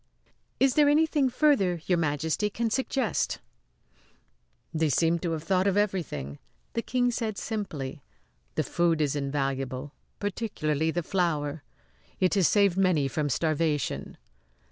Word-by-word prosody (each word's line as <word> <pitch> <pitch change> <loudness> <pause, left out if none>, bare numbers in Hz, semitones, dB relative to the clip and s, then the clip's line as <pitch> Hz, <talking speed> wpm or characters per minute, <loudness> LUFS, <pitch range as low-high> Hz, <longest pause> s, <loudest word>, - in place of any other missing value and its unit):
"Is 270 -1 +4
there 295 -1 +5
anything 300 -2 +3
further 245 - +2
Your 180 -2 +2
Majesty 160 +6 0
can 225 +2 -2
suggest?" 265 -1 0 1.4
"They 160 -1 +1
seem 165 +5 +2
to 170 -1 -2
have 155 -1 -4
thought 185 +2 +2
of 195 0 +2
everything," 155 - -1 0.3
the 230 - 0
King 245 0 +1
said 220 -3 -3
simply. 150 - -4 0.5
"The - - +1
food 170 -2 +1
is 150 -2 +1
invaluable 135 -1 -2 0.2
particularly 160 -7 -1
the 175 +1 -1
flour. 155 -5 -1 0.6
It 185 - +3
has 195 -6 +4
saved 200 -3 +3
many 180 -7 +3
from 145 +2 -1
starvation." 155 -1 -1
170 Hz, 130 wpm, -28 LUFS, 150-210 Hz, 1.4 s, there